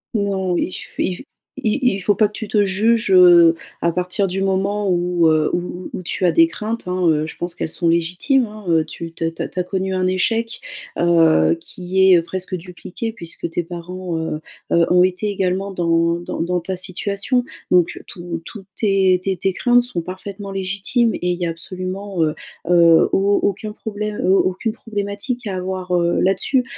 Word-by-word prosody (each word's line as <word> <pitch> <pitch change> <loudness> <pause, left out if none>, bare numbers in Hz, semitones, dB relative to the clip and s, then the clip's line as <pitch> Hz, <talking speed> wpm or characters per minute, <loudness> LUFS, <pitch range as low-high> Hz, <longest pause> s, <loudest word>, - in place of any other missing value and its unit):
Non, 195 -3 0
il - - -1
f - - -6
il 185 - 0
f - - -9 0.4
i 220 +6 +1 0.2
il - - -4
faut 205 +2 +2
pas 215 +2 +4
que 210 - -18
tu 220 - -6
te 205 -1 +2
juges, 215 +3 +1
heu, 175 -3 +8 0.3
à 170 - +2
partir 180 +3 0
du 190 +1 -3
moment 195 +1 0
où, 175 -1 +2
heu, 155 -1 +2
où 180 +1 -4
où - - -4
tu 185 +1 -2
as 175 - +4
des 165 0 +5
craintes, 215 +6 -5
hein, 180 -1 0
heu, 155 0 +1
je - - -9
pense 175 0 -2
qu'elles 170 - -4
sont 170 +2 0
légitimes, 180 - +2
hein, 215 -1 -11
heu, 165 -1 +3
tu 165 +2 -8
te 165 - -4
tu 165 - -15
as - - -2
tu - - -6
as - - +1
connu 190 +1 -2
un 185 0 +1
échec, 225 +5 0 0.4
heu, 165 -1 +4
qui 190 +3 +1
est 175 -2 +6
presque 185 +2 -5
dupliqué 180 +5 -6
puisque 170 -7 -7
tes 175 - -1
parents, 175 +1 -6
heu, 160 -1 -3 0.3
heu, 170 0 +4
ont 180 0 +6
été 185 +3 0
également 195 0 -1
dans 170 -2 +1
dans 175 - -5
dans 180 +1 0
ta 185 +3 -4
situation. 200 +7 -1 0.3
Donc 180 -2 +2
tout 170 -2 -6
toutes 200 -1 -10
tes 190 -3 +2
tes 190 -1 -1
tes 190 +2 0
craintes 245 +4 +3
sont 240 -8 -3
parfaitement 195 +3 -7
légitimes 200 +5 0
et 180 - -2
il 175 0 -1
y 175 - -1
a 165 - -1
absolument, 185 +2 -4
heu, 155 -1 +1 0.4
heu, 170 -2 +6
au 200 +1 +2
aucun 205 +2 -1
problème, 210 -1 -5
heu, 185 - +4
aucune 195 +4 0
problématique 215 +3 -4
à 200 -3 -3
avoir, 185 0 -4
heu, 170 -1 +1
là-dessus. 195 +7 +2
185 Hz, 200 wpm, -20 LUFS, 175-200 Hz, 0.4 s, heu